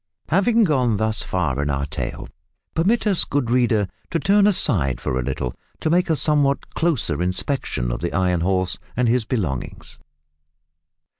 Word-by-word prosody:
Having 225 +7 +3
gone 130 - +1
thus 110 +1 +1
far 75 -7 -1
in 70 - -2
our 70 0 -1
tale, 75 - -5 0.5
permit 205 +10 +1
us, 200 -4 +4
good 135 -4 -1
reader, 120 -5 +2 0.2
to 170 - -1
turn 200 +3 +4
aside 95 - +2
for 65 0 -2
a - - -1
little 60 0 -3 0.3
to 155 - -1
make 180 +1 +2
a 160 - +3
somewhat 145 -2 +1
closer 130 - 0
inspection 90 - -1
of - - -3
the 85 - -2
Iron 90 -2 +1
Horse 95 0 0 0.2
and 125 -1 +2
his 120 0 +2
belongings. 90 - -4
115 Hz, 160 wpm, -21 LUFS, -, 0.5 s, us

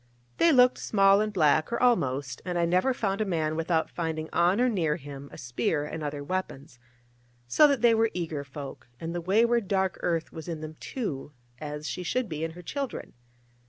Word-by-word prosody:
They 335 - +5
looked 250 -2 +5
small 195 -1 +4
and 215 0 -1
black, 155 -3 +3
or 235 - -1
almost; 135 - +1
and 180 -1 -3
I 170 - +2
never 180 +9 +2
found 200 -4 -1
a - - +4
man 160 -5 -1
without 165 0 0
finding 160 -2 -4
on 175 +5 +3
or 250 - +4
near 170 -10 +1
him 140 -2 -9
a - - -11
spear 125 +5 -1
and 155 +1 -6
other 145 -1 -4
weapons: 140 -7 -5 0.7
so 295 - +6
that 280 -5 +1
they 235 -1 +6
were 225 0 +3
eager 160 -5 -3
folk, 140 0 -9
and 165 +1 -4
the 175 - -3
wayward 225 +4 +2
dark 190 -2 0
earth 165 -2 -1
was 160 0 -8
in 165 -3 -4
them, 155 0 -6
too, 150 - -5 0.3
as 150 0 -5
she - - -4
should 245 +7 -1
be 155 -1 -4
in 165 0 -3
her 175 +1 -11
children. 275 - -5
170 Hz, 200 wpm, -28 LUFS, 150-210 Hz, 0.7 s, so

